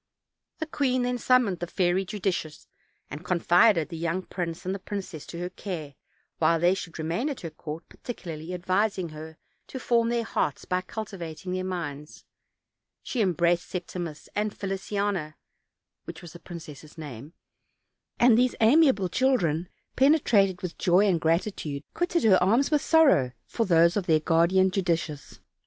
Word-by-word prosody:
The 315 - -3
queen 260 -5 0
then 245 0 -1
summoned 235 -8 +3
the 175 - -4
Fairy 180 +1 +1
Judicious, 185 -6 -3 0.4
and 150 - -7
confided 175 0 +3
the 165 - -6
young 170 +3 -2
prince 175 -2 -5
and 190 +1 -3
princess 190 -7 -6
to 170 - -8
her 180 +1 -4
care 165 -7 -6 0.5
while 165 0 +3
they 175 +2 +4
should 190 -4 -6
remain 165 - -1
at 280 - -5
her 165 -3 -6
court, 155 +1 -8
particularly 165 -8 -7
advising 185 +1 0
her 155 +1 -10 0.3
to 260 - -7
form 235 -2 +2
their 235 -1 0
hearts 150 - -2
by 180 0 0
cultivating 185 -4 -7
their 185 0 -2
minds; 150 -5 -6 0.8
she 250 - -2
embraced 175 -3 +1
Septimus 175 -3 -6
and 210 0 -2
Feliciana 195 -4 -2 0.7
(which - - -9
was 170 - -10
the 175 - -11
prin 170 -1 -8
cess' 155 0 -12
name), 145 -1 -9 0.9
and 240 -1 +6
these 250 0 +2
amiable 235 - +4
children, 180 - +1 0.3
penetrated 230 - +3
with 180 - -5
joy 185 +3 +4
and 175 -4 +1
gratitude, 165 -3 -1
quitted 350 0 0
her 195 -5 +5
arms 230 - +3
with 300 -2 +3
sorrow 280 - +4
for 230 -3 -2
those 170 0 +4
of 200 -4 -1
their 160 -2 +4
guardian 170 +4 +3
Judicious. 165 - -2
180 Hz, 155 wpm, -27 LUFS, 165-210 Hz, 0.9 s, and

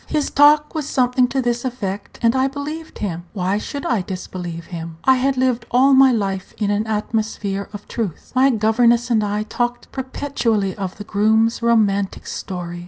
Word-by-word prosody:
His 300 -2 -1
talk 295 +1 +5
was 310 -3 -3
something 250 0 +2
to 265 +1 -1
this 240 0 -1
effect, 205 -6 -4
and 230 +2 +4
I 260 +1 +3
believed 295 +4 -6
him. 175 -4 -4
Why 195 0 0
should 280 +6 -6
I 230 -5 +1
disbelieve 180 -2 -6
him? 165 -1 -6
I 265 -1 +5
had 265 +1 +1
lived 250 -2 0
all 265 +3 +4
my 265 0 +7
life 195 -5 -2
in 205 -2 0
an 210 +2 0
atmosphere 210 -2 -2
of 205 -1 -9
truth. 215 -9 -5
My 260 +1 +4
governess 235 +1 +2
and 220 -2 +3
I 210 +1 -1
talked 240 +2 -3
perpetually 255 -7 -1
of 190 -3 -5
the 205 - -7
groom's 220 +3 +2
romantic 205 -4 +1
story. 175 -2 -5
225 Hz, 175 wpm, -20 LUFS, 200-260 Hz, -, my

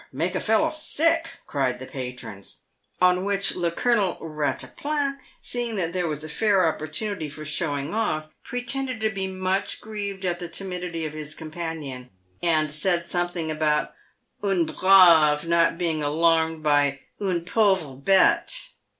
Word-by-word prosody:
Make 165 +7 -1
a 185 - 0
fellow 220 0 +2
sick," 330 +1 +1 0.2
cried 130 -3 -1
the 130 - -8
patrons; 125 -7 -8 0.4
on 180 0 +4
which 200 0 +1
le 175 -2 0
Colonel 205 +1 +1
Eattaplan, 275 - -2 0.3
seeing 240 -2 -2
that 175 -4 -1
there 180 -2 0
was 150 -1 -3
a - - -5
fair 205 +6 +2
oppor 160 -2 0
tunity 165 -3 -3
for 155 +1 -9
showing 145 -1 -2
off, 205 -9 0 0.2
pretended 250 0 -3
to 220 0 +1
be 195 -2 -3
much 185 +1 -1
grieved 200 -3 -5
at 175 -1 -1
the 175 - -5
timidity 180 -2 -4
of 155 - -5
his 155 0 -6
companion, 155 -6 -6 0.3
and 155 -3 +2
said 170 +3 0
something 175 -2 -2
about 155 -1 0 0.5
un 195 -4 +2
brave 165 -3 +6
not 165 0 +3
being 165 -3 0
alarmed 160 +1 +2
by 145 -2 +2 0.2
une 180 -4 -1
pauvre 190 -8 +2
bete. 195 - +2
170 Hz, 150 wpm, -25 LUFS, 155-195 Hz, 0.5 s, brave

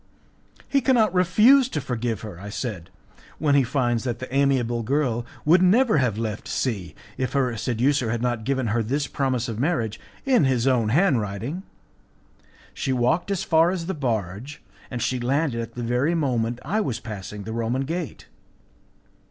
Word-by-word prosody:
"He 275 - +2
cannot 230 -6 +3
refuse 220 +9 +5
to 155 - -2
forgive 120 -5 -3
her," 105 -6 -8
I 100 +2 -7
said, 105 -6 -5 0.5
"when 150 -2 +1
he 140 - +6
finds 120 -2 0
that 120 -2 -2
the 130 +1 -8
amiable 130 -4 +2
girl 120 -1 0 0.2
would 170 +4 +5
never 215 - +4
have 120 -6 0
left 110 -2 -4
C 95 - -2 0.2
if 130 -2 -1
her 130 -4 +1
seducer 125 +3 +1
had 120 +1 -1
not 120 -2 -1
given 130 -1 0
her 115 +2 +1
this 140 +6 -1
promise 130 -4 -1
of 115 -2 -4
marriage 120 -7 -1 0.3
in 255 - +4
his 130 -2 +1
own 125 -5 +2
handwriting. 130 - 0 1.1
She 135 - -2
walked 130 +9 +1
as 195 -2 -1
far 165 +1 +4
as 180 -2 -3
the 190 - -2
barge, 120 - -3 0.3
and 125 -3 -3
she 130 - 0
landed 130 0 0
at 115 - -8
the 120 - -4
very 125 +8 +1
moment 120 -6 0
I 210 +9 0
was 125 - -2
passing 105 -2 -7
the 110 +2 -6
Roman 115 +3 -1
gate. 165 +2 -5
130 Hz, 170 wpm, -24 LUFS, 115-150 Hz, 1.1 s, he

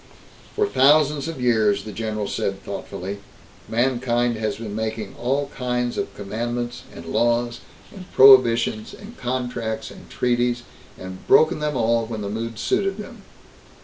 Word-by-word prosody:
"For 425 - +2
thousands 150 - +4
of 165 -4 -5
years," 110 -5 +2
the 110 - -7
general 110 0 -3
said - - -3
thoughtfully, 100 +3 -6 0.5
"mankind 120 0 +1
has 110 0 -2
been 110 -2 -6
making 110 -2 -4
all 135 +4 -1
kinds 125 -1 -1
of - - -3
commandments 120 +4 -4
and 85 - -10
laws 120 +6 +1 0.3
and 185 -3 -11
prohibitions 120 -5 +5
and 215 +4 -12
contracts 120 - -3
and - - -14
treaties 120 0 0 0.3
and 95 0 -9
broken 155 +1 +5
them 150 -2 -1
all 115 0 +1
when 110 -2 -5
the 100 - -4
mood 115 +1 -4
suited 195 - 0
them. 220 +1 -9
120 Hz, 145 wpm, -23 LUFS, 110-130 Hz, 0.5 s, prohibitions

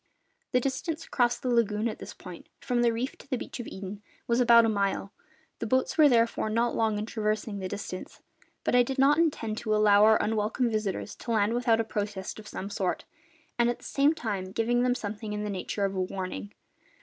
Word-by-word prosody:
The 250 - +4
distance 305 +5 -3
across 240 -2 +1
the 250 - -2
lagoon 220 -1 +2
at 220 - -5
this - - -9
point, 180 -2 -11
from 245 -1 0
the 240 -1 +4
reef 235 +3 -3
to - - -15
the 255 - 0
beach 250 - -7
of 240 - -5
Eden, 195 +1 -7 0.2
was 235 +1 +1
about 235 -1 +7
a - - +2
mile; 200 -2 -1 0.5
the - - -3
boats 260 +3 +1
were 305 -2 +7
therefore 230 -3 +2
not 230 +2 +1
long 220 -2 +1
in 210 - -2
traversing 215 -2 -2
the 190 - -3
distance. 185 -1 -7 0.4
But - - 0
I 245 - +6
did 265 +3 -2
not 280 +3 +5
intend 230 -10 0
to 215 -2 0
allow 210 -1 +5
our 220 0 +6
unwelcome 220 +3 0
visitors 215 -1 -2
to - - -10
land 215 0 +2
without 235 -2 +2
a - - +2
protest 205 -2 -4
of 215 - -11
some 200 0 -6
sort, 190 -2 -2 0.5
and 235 0 +4
at 240 - -1
the - - -16
same 285 +3 +2
time 200 -8 -3
giving 240 +3 +1
them 250 0 +2
something 210 -1 -5
in 210 0 -3
the 210 - -3
nature 200 +1 -2
of 195 - -2
a 190 - -1
warning. 185 - -4
220 Hz, 220 wpm, -28 LUFS, 205-240 Hz, 0.5 s, about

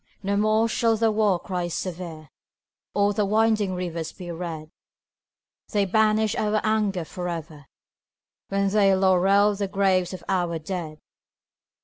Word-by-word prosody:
No 200 +1 0
more 215 +2 +2
shall 225 0 +1
the 225 0 +2
war 210 -4 +2
cry 180 -2 -3
sever, 170 -3 -6 0.7
Or 205 0 +3
the 210 - +1
winding 215 -2 +2
rivers 170 -3 -4
be 180 -2 -8
red; 165 -2 -6 1.0
They 205 -1 +2
banish 215 +2 +2
our 215 0 +1
anger 210 -5 0
forever 165 -5 -6 0.8
When 200 0 0
they 195 -1 +4
laurel 195 +2 +4
the 200 0 -2
graves 190 -2 +1
of 185 - -8
our 175 -3 0
dead! 160 -1 -5
195 Hz, 130 wpm, -24 LUFS, 175-210 Hz, 1.0 s, they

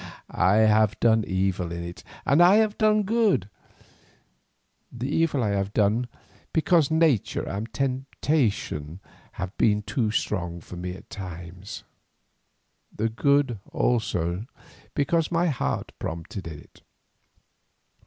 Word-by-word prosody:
I 95 +2 +3
have 110 -1 +4
done 110 -1 +4
evil 95 -2 -1
in 85 0 -4
it 85 +1 -8 0.2
and 140 +5 +4
I 180 +3 +7
have 215 -1 +3
done 215 -1 +4
good; 210 - +2 1.4
the 120 +2 -4
evil 150 -3 +1
I 105 - +1
have 100 0 -1
done 110 +4 +2 0.5
because 160 -2 +3
nature 160 - +2
and 105 +4 -4
temptation 130 - -1 0.3
have 90 +2 -5
been 105 -2 +3
too 115 0 -1
strong 90 -5 -2
for 90 - -11
me 90 +1 -5
at - - -15
times, 90 0 -8 1.1
the 110 +2 -1
good 135 0 +2
also 95 -4 0 0.5
because 160 +3 +1
my 170 +1 +2
heart 135 - -2
prompted 85 +4 -5
me - - -5
to 75 - -10
it. - - -23
110 Hz, 125 wpm, -25 LUFS, 95-145 Hz, 1.4 s, I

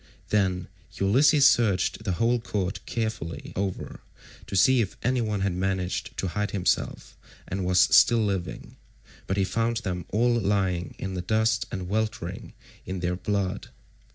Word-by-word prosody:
Then 95 -3 +1 0.3
Ulysses 140 +8 +5
searched 110 -4 +2
the 95 - 0
whole 115 +6 +2
court 100 -4 -3
carefully 110 -8 -4
over, 95 -1 -3 0.5
to - - -5
see 130 +6 +5
if 100 - -4
anyone 115 -5 0
had 100 -1 0
managed 95 +4 -2
to 95 - -1
hide 105 +3 -2
himself 95 -3 -1 0.3
and 95 +1 -3
was 90 0 +4
still 110 +4 +5
living, 95 -4 -4 0.5
but 95 - -1
he 100 - +3
found 115 +4 0
them 90 -5 -3
all 120 +4 +2
lying 95 -5 0
in 95 0 -5
the 90 - -3
dust 110 +4 +1
and 95 -2 -4
weltering 105 -3 -3 0.3
in 95 -1 -5
their 90 0 0
blood. 100 0 -2
100 Hz, 150 wpm, -26 LUFS, 90-110 Hz, 0.5 s, Ulysses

